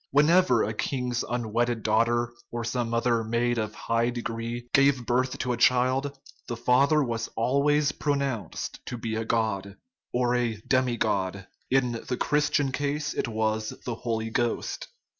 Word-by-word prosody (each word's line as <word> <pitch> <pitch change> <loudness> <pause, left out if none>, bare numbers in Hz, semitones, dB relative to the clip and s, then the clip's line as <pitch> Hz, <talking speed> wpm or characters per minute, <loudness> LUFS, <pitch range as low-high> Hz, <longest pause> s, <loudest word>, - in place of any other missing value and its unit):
Whenever 165 +6 +4
a - - -1
king's 125 -3 -1
unwedded 120 0 -1
daugh 110 +1 +4
ter, 120 0 0 0.2
or 120 0 -4
some 115 0 -2
other 115 -1 +1
maid 120 +1 0
of 110 -1 -3
high 115 +1 0
degree, 120 0 -4
gave 135 -3 +4
birth 125 +2 +1
to 125 -1 -1
a - - -3
child, 130 +4 +2 0.3
the 120 - -4
father 135 +5 +4
was 115 -2 -2
always 140 +5 +2
pronounced 140 -8 -2
to 120 - -4
be 110 -1 -3
a 110 - -1
god, 100 -4 -1 0.4
or 125 0 +1
a 120 -2 +1
demi 130 0 +1
god; 95 -2 -1 0.2
in 130 -2 +2 0.2
the 125 - -1
Christian 145 -1 +1
case 145 +2 -2
it - - -1
was 110 -1 -1
the 120 - -2
Holy 115 -1 -3
Ghost. 120 0 -1
120 Hz, 160 wpm, -27 LUFS, 115-130 Hz, 0.4 s, Whenever